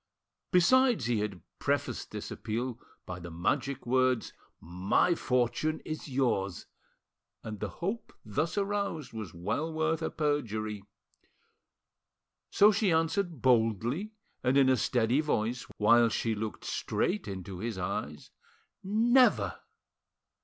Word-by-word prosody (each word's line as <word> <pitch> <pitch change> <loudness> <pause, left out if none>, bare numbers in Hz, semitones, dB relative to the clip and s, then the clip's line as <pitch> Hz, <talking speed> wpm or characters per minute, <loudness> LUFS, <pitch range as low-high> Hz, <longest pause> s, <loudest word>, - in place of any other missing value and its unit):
Besides, 235 - +4
he 120 -2 +1
had 105 -3 -3 0.2
prefaced - - -1
this - - -6
appeal 120 +2 -3 0.3
by 90 0 -6
the 85 0 -8
magic 130 - -1
words, 130 -1 +1 0.3
"My 90 - +1
fortune' 125 +2 0
is 155 0 -5
yours!" 115 -9 0 0.8
and 110 -2 -6
the - - -3
hope 200 +7 -4
thus 155 - -1
aroused 200 -7 -2
was 110 -7 -7
well 110 - -2
worth 160 0 0
a - - -1
perjury. 110 -9 -2 1.7
So 210 +2 +6
she 205 -2 +1
answered 165 - 0
boldly 120 - +2 0.3
and 130 +2 +3
in 135 -1 +5
a 130 - +5
steady 120 +2 +1
voice, 120 -5 -1
while 115 +2 +5
she 115 0 -1
looked 110 0 -5
straight 105 0 -1
into 95 -1 -6
his 110 0 -3
eyes— 75 -5 -4 0.5
"Never!" 235 +6 +3
125 Hz, 120 wpm, -30 LUFS, 110-160 Hz, 1.7 s, So